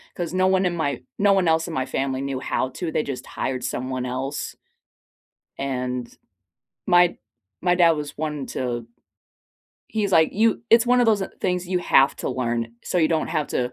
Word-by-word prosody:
'cause 175 -1 -4
no 185 0 +3
one 190 0 +3
in 175 -1 0
my 145 -6 -2 0.2
no 200 0 +5
one 190 -3 +2
else 160 +1 +2
in 170 - -5
my 130 -4 -1
family 135 0 -2
knew 135 -1 -3
how 130 0 -1
to. 160 +5 -5
They 155 - 0
just 135 -2 -5
hired 130 -1 -3
someone 130 0 -3
else. 130 +3 -4 1.0
And, 125 -3 -3 0.7
my 175 -1 +4 0.4
my 180 0 +3
dad 175 -2 +5
was 150 -2 -3
one 150 -3 -3
to 120 -2 -3 1.0
he's 210 -2 -1
like, 160 -3 +5
"You 225 +2 +2
it's 230 0 +6
one 250 0 +3
of 245 - +4
those 215 -3 +3 0.2
things 180 -1 -1
you 180 -1 +1
have 135 -5 +4
to - - -3
learn, 120 -2 -2
so 180 - -1
you 160 - +4
don't 160 -1 0
have 150 - -1
to 125 0 -1
155 Hz, 190 wpm, -23 LUFS, 130-180 Hz, 1.0 s, it's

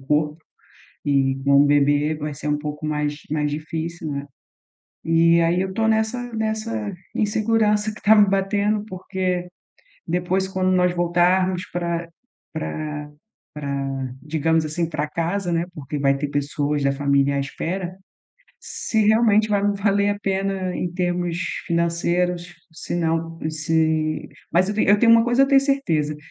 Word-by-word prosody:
corpo, 150 +2 0 0.7
e 135 -2 +2
com 140 0 +5
um - - +3
bebê 145 +1 +3
vai 150 0 -4
ser 150 - -8
um 150 0 +1
pouco 150 0 -5
mais 150 -1 -1
mais 150 -1 0
difícil, 160 +2 -4
né, 140 0 -4 0.8
e 165 +1 +4
aí 170 +2 +2
eu 190 0 -3
tô 220 +2 +1
nessa 220 +3 0
nessa 215 - -2 0.2
insegurança 215 0 +1
que - - -13
tá 220 +1 +6
me 205 -2 +6
batendo, 205 +2 0
porque 185 -2 -3 0.6
depois, 180 +3 0
quando 185 -1 0
nós 180 -1 +3
voltarmos 180 +1 +1
pra 170 -1 -2 0.4
pra 150 -1 -5 0.4
pra 140 -2 -3 0.3
digamos 160 +1 +1
assim, 160 +2 -2
pra 155 -2 -2
casa, 175 +3 -2
né, 170 0 0
porque 145 -1 -6
vai 140 0 +3
ter 145 +1 -2
pessoas 145 0 -1
da 140 - +3
família 140 0 +1
à - - +1
espera, 175 +6 -4 0.6
se 220 -2 -1
realmente 215 -1 +4
vai 205 -1 +1
me 205 0 +1
valer 200 0 +2
a 205 - -2
pena 195 -2 -1
em 175 - -2
termos 175 -1 -1 0.3
financeiros, 170 +1 0 0.2
se 160 - -6
não 165 0 -1
se 155 0 0 0.3
Mas 185 +3 +3
eu 210 - -3
te 215 - +2
eu 205 +1 +5
tenho 230 +1 +6
uma 230 - +7
coisa 240 +2 +3
eu 275 - +4
tenho 275 -1 +6
certeza, 165 - 0
170 Hz, 155 wpm, -22 LUFS, 150-195 Hz, 0.8 s, uma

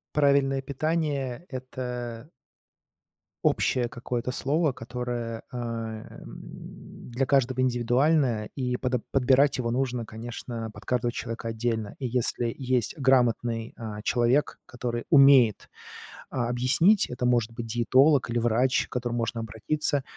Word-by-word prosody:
Правильное 140 -2 +3
питание- 145 0 -2
это 125 -1 -6 1.2
общее 125 -2 +2
какое-то 120 +1 -4
слово, 150 +5 +1
которое, 120 -1 -5
э, 125 - -6
м, 115 -2 -8
для 130 +3 -1
каждого 130 -2 +2
индивидуальное, 125 -1 +2
и 125 -2 -1
подо 125 -1 -1
подбирать 135 +1 +3
его 115 -2 -1
нужно, 125 -2 -1
конечно, 115 0 -6
под - - -13
каждого 120 -1 0
человека 115 -1 -5
отдельно. 110 -2 -2
И 130 - -3
если 120 -1 -1
есть 130 0 -1
грамотный, 120 -4 +1
а, 110 -2 -6
человек, 120 +5 +1
который 120 -1 -4
умеет, 135 - +6 0.6
а, 120 -2 -1
объяснить- 135 - +3
это 125 0 -4
может 120 -2 +2
быть 115 0 -6
диетолог 130 +4 +3
или 120 - 0
врач, 120 +3 +2
к - - -39
которому 120 -1 -2
можно 115 0 -2
обратиться- 135 +6 -1
125 Hz, 125 wpm, -27 LUFS, 115-135 Hz, 1.2 s, умеет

